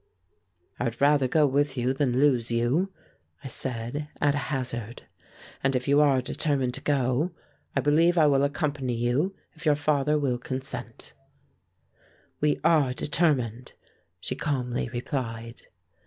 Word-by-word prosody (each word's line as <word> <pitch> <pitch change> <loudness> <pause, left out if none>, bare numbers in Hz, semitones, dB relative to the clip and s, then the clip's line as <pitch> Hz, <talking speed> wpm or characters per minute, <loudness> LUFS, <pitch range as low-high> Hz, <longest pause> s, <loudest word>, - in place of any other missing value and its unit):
"I 125 - -1
would 115 -1 -3
rather 140 -1 +4
go 150 +4 +3
with 140 0 +1
you 125 +2 +1
than 130 -3 0
lose 130 -5 +3
you," 120 +11 +1 0.5
I - - -5
said 130 +3 -4
at 145 -1 +3
a - - -1
hazard, 120 -4 -4 0.6
"and 135 0 +2
if 125 +1 -1
you 140 +1 +5
are 135 -3 +3
determined 135 -2 -1
to - - -6
go, 140 +4 0 0.4
I 135 - +2
believe 165 +5 +3
I 160 - +6
will 140 -2 +4
accompany 140 -3 -1
you 125 +11 0 0.2
if 165 - -14
your 150 -3 +4
father 150 0 +1
will 130 -4 0
consent." 130 +1 -4 1.3
"We 150 0 +2
are 155 -6 +4
determined," 130 -6 0 0.5
she - - -3
calmly 125 -4 -2
replied. 120 -2 -5
135 Hz, 140 wpm, -27 LUFS, 125-150 Hz, 1.3 s, I